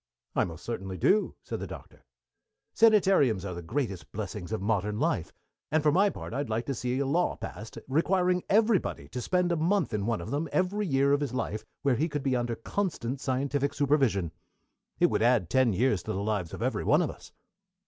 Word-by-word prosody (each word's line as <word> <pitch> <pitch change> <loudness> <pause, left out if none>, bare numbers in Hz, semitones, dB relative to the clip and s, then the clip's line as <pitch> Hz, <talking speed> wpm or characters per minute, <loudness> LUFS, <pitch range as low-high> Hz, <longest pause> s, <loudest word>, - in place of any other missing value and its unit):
"I - - +3
most 85 -1 -9
certainly 95 -5 -4
do," 205 - +2
said - - -5
the - - -5
Doctor. - - -11 0.7
"Sanitariums 190 - +4
are 90 - -4
the 85 - -6
greatest 105 - -3
blessings 100 -2 -5
of 110 - -1
modern 105 +1 0
life, 125 - 0 0.4
and, 155 -1 +2
for 150 - +4
my 195 +6 +4
part, 175 - -7
I'd 140 +1 -2
like 115 +2 -1
to 140 - -2
see 125 +1 -2
a 140 - 0
law 170 +6 +1
passed 110 +1 -8
requiring 180 +5 +2
everybody 210 - +2
to 125 +3 -5
spend 180 +6 +1
a - - +2
month 170 - +1
in 105 0 -1
one 115 -1 0
of - - -6
them 150 +3 -1
every 195 +2 0
year 140 -1 +3
of 145 - +2
his 135 -4 -2
life, 110 -4 -3 0.2
where 135 -4 +2
he 160 +4 0
could 145 -2 -3
be 135 -2 +1
under 120 -1 -1
constant 135 - -3
scientific 140 +2 -1
supervision. 135 - +2 0.7
It - - +4
would - - +1
add 115 -7 +3
ten 130 -3 +4
years 105 -1 +1
to - - -4
the 95 +2 -2
lives 100 -6 -1
of - - -5
every - - -1
one - - +4
of - - -2
us." - - -15
130 Hz, 210 wpm, -28 LUFS, 105-160 Hz, 0.7 s, Sanitariums